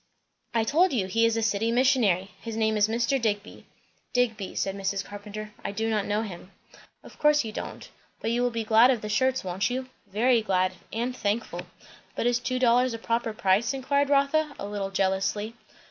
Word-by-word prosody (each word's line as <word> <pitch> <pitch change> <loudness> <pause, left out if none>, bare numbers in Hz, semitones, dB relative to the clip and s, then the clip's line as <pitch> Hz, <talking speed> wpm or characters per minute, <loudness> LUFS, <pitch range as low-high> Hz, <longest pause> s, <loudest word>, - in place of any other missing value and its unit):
"I 225 - +3
told 320 +8 +3
you, 215 -7 +1
he 230 +5 +2
is 230 0 0
a 225 - 0
city 220 +1 +1
missionary. 230 -8 +2
His 225 -1 -5
name 220 -1 +2
is 210 0 +3
Mr. 240 +4 0
Digby." 210 -2 -3 0.5
"Digby," 225 -6 0
said 195 0 -1
Mrs. 195 0 -2
Carpenter. 210 +1 -8
"I - - -3
do 225 +2 -1
not 210 -2 0
know 210 +2 0
him." 180 -3 -8 0.5
"Of - - -15
course 300 -1 +4
you 220 - -5
don't. - - -7 0.3
But 225 - -2
you 240 +1 +1
will 245 - +2
be 230 -1 -3
glad 225 +3 +6
of 245 -4 +2
the 210 - -5
shirts, 260 +4 +1
won't 185 +4 -1
you?" 255 +1 -3 0.2
"Very 230 +4 +3
glad, 185 -3 +1 0.2
and 240 +3 -2
thankful." 220 0 -2 0.5
"But - - -2
is 245 0 +2
two 255 +1 -2
dollars 250 0 +3
a - - -4
proper 230 0 -1
price?" 215 +3 +1
inquired 280 +2 +1
Rotha 285 +2 +2
a - - -5
little 205 -1 -3
jealously. 195 +3 0
225 Hz, 195 wpm, -27 LUFS, 205-245 Hz, 0.5 s, glad